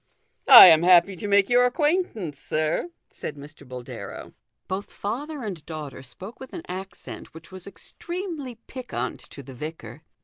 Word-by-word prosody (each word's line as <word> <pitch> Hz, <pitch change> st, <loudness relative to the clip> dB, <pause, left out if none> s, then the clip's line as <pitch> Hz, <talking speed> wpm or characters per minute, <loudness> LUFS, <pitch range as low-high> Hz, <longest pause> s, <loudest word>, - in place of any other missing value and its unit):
" -, -, -47 dB
I 250 Hz, -7 st, +12 dB
am 165 Hz, -3 st, +7 dB
happy 180 Hz, +2 st, +5 dB
to 205 Hz, -, -5 dB
make 200 Hz, -1 st, +4 dB
your 245 Hz, 0 st, +4 dB
acquaintance, 250 Hz, -, -1 dB
sir," 155 Hz, -, -2 dB, 0.2 s
said 150 Hz, -, -7 dB
Mr. 145 Hz, 0 st, -13 dB
Boldero. 125 Hz, -1 st, -9 dB, 0.3 s
Both 190 Hz, +2 st, -5 dB
father 280 Hz, +7 st, -5 dB
and 185 Hz, -8 st, -6 dB
daughter 150 Hz, -5 st, -7 dB
spoke 190 Hz, -, -11 dB
with 265 Hz, -, -11 dB
an 340 Hz, -, -7 dB
accent 190 Hz, -3 st, -9 dB
which 165 Hz, +3 st, -13 dB
was 185 Hz, -1 st, -10 dB
extremely 315 Hz, -, -7 dB
piquant 255 Hz, -2 st, -5 dB
to 140 Hz, -, -10 dB
the 135 Hz, -, -11 dB
vicar. 155 Hz, +3 st, -8 dB
190 Hz, 160 wpm, -24 LUFS, 155-250 Hz, 0.3 s, I